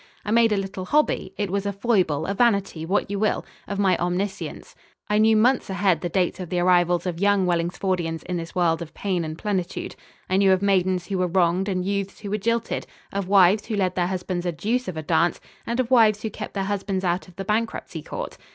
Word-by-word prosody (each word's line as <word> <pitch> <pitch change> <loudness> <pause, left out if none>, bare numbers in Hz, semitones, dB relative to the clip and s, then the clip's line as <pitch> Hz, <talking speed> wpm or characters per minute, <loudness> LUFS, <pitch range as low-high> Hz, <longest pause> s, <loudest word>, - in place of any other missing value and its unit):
I 210 - -2
made 230 0 +4
a 210 - +2
little 195 -1 -4
hobby 300 +8 +1
it 205 -3 -2
was 200 0 -1
a - - 0
foible, 190 -8 +1
a 195 - -1
vanity, 200 -7 +1
what 195 +1 0
you 200 - -2
will 215 0 0 0.2
of 200 - -4
my 195 -2 +3
omniscience. 180 +3 -3 0.3
I 210 0 +2
knew 220 0 +5
months 245 +2 +3
ahead 185 -3 +1
the 175 - -2
dates 180 +1 0
of 180 -3 -6
the 180 - -1
arrivals 175 -1 +3
of 175 -2 -3
young 200 -1 +3
Wellingsfordians 175 -1 -1
in 180 - -4
this 165 -1 -7
world 170 -2 +2
of 165 -2 -8
pain 185 -4 -1
and 155 0 -5
plenitude. 190 -3 -3 0.3
I 185 - +1
knew 195 -1 +5
of 190 +1 0
maidens 185 -2 +2
who 190 0 -2
were 180 - +2
wronged 180 +2 +1
and 185 -1 -1
youths 200 0 -3
who 200 -2 -6
were 210 - 0
jilted; 230 +2 -1 0.3
of 200 -2 -2
wives 195 +1 +5
who 220 - -2
led 185 -3 +1
their 175 -1 0
husbands 180 -1 -3
a - - +1
deuce 225 - -1
of 180 - -5
a 155 - -4
dance, 170 +3 +2 0.3
and 235 +2 -1
of 255 -1 0
wives 220 -4 +5
who 220 - -2
kept 210 - -7
their 195 - 0
husbands 195 -1 -2
out 180 +1 -1
of 180 - -17
the 195 - -5
bankruptcy 225 +3 -2
court. - - -6
190 Hz, 230 wpm, -24 LUFS, 180-205 Hz, 0.3 s, knew